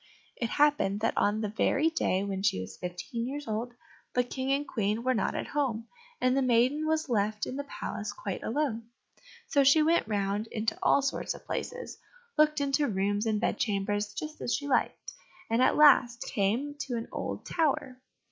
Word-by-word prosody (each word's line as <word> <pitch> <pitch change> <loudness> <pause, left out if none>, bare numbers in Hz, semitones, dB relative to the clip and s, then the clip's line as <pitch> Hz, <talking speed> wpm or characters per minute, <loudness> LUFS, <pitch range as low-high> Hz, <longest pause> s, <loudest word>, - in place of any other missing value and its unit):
It 235 - -2
happened 290 -9 +2
that 225 - +1
on 210 +2 +1
the 215 - -1
very 280 +8 +2
day 195 - 0
when 195 -1 -3
she 195 - +1
was 95 +1 -7
fifteen 180 +7 -5
years 285 +1 -5
old, 230 +3 -3 0.4
the 250 - +4
King 260 +2 -3
and 280 +1 0
Queen 215 +1 -1
were 255 +1 +2
not 220 - 0
at - - -3
home, 250 -6 -1 0.3
and 255 0 +2
the 275 - +2
maiden 255 +5 +2
was 315 0 0
left 210 -3 0
in 255 - -5
the 285 +1 -4
palace 210 -6 -5
quite 200 -2 -5
alone. 230 -3 -2 0.6
So 285 -3 +3
she 285 +3 +6
went 330 -3 +2
round 205 0 -1
into 220 0 -2
all 280 - +4
sorts 275 - -2
of - - -14
places, 485 0 -5 0.4
looked 305 0 +4
into 280 +1 +1
rooms 205 +1 0
and 215 -1 +1
bed - - -1
chambers 205 0 -1
just 305 +8 -7
as 240 - 0
she 285 - -4
liked, 280 - 0 0.4
and 230 +2 +3
at - - +4
last 260 -5 +6
came 230 +9 0
to 245 - -2
an 230 - -5
old - - -4
tower. 270 -5 -1
240 Hz, 190 wpm, -29 LUFS, 210-285 Hz, 0.6 s, she